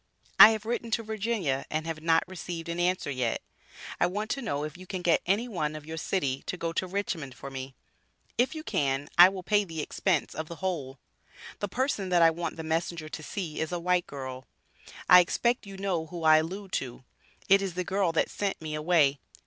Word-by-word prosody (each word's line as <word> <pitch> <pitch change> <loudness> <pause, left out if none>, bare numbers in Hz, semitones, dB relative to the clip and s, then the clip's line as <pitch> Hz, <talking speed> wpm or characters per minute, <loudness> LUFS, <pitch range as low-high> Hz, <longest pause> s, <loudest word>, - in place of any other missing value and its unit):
I - - +13
have 220 -1 -2
written 235 0 -2
to 230 - -7
Virginia 215 - -1
and 155 +1 -2
have 160 -1 -4
not 165 0 +2
received 175 -2 -6
an 170 +1 -3
answer 180 -4 0
yet. 125 -4 -1 0.6
I - - +4
want 210 +4 -3
to 275 - -2
know 150 - -2
if 150 -1 -5
you 185 +1 -12
can 185 -2 -5
get 170 -1 +3
any 205 +6 +1
one 155 -9 -2
of 155 -1 -8
your 160 +1 -6
city 140 -6 -1
to 180 - -3
go 165 -1 -3
to 185 - -1
Richmond 175 -8 -3
for 140 - -9
me. 135 0 -7 0.6
If 255 +7 +1
you 310 - -6
can, 140 - -1
I 180 +1 +11
will 190 -1 -7
pay 205 +3 +3
the 165 -4 -7
expense 165 +2 0
of 160 - -5
the 170 - -7
whole. 150 -6 -3 0.6
The 205 - -2
person 230 -4 -1
that 175 -2 +4
I 165 - +7
want 170 +1 -4
the 160 - -5
messenger 160 0 -2
to 155 - -6
see 160 0 -5
is 160 - -2
a 175 - -2
white 180 +1 +1
girl. 130 -2 -7 0.6
I 180 - +10
expect 235 +6 +1
you 195 -1 -9
know 185 -5 -2
who 170 0 -7
I 155 0 +7
allude 185 +5 -3
to, 125 -1 -4 0.4
it 195 +1 +6
is 190 -3 -3
the 180 - -1
girl 190 -1 +1
that 165 - +1
sent 200 -1 -2
me 155 -1 -5
away. 150 -3 +3
170 Hz, 220 wpm, -28 LUFS, 155-195 Hz, 0.6 s, I